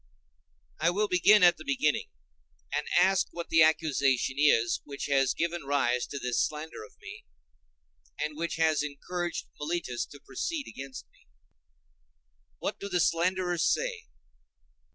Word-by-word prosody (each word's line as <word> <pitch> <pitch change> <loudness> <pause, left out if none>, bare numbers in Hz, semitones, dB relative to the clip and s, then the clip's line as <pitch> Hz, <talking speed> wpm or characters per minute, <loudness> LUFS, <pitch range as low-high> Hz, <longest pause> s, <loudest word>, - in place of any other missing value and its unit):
I 165 +2 +3
will 205 +4 0
begin 195 +2 +5
at 175 -1 +6
the 155 - -10
beginning, 140 +1 0 0.6
and - - -1
ask 190 0 +3
what 170 -1 -7
the 160 - +5
accusation 140 -5 +2
is 120 -6 +3
which 140 -1 -6
has 135 -2 +2
given 170 0 -2
rise 130 -3 0
to 140 - -6
this 125 -3 0
slander 155 -4 -5
of 105 - -15
me, - - -11 0.9
and 150 0 -2
which 165 +2 -3
has 160 -2 +2
encouraged 175 +4 -4
Meletus 150 -5 -3
to 145 - -13
proceed 280 - -4
against 135 - -8
me. - - -28 1.3
What - - -4
do 200 - -6
the 180 -2 0
slanderers 175 +1 +1
say? 470 -2 -2
160 Hz, 140 wpm, -29 LUFS, 140-175 Hz, 1.3 s, at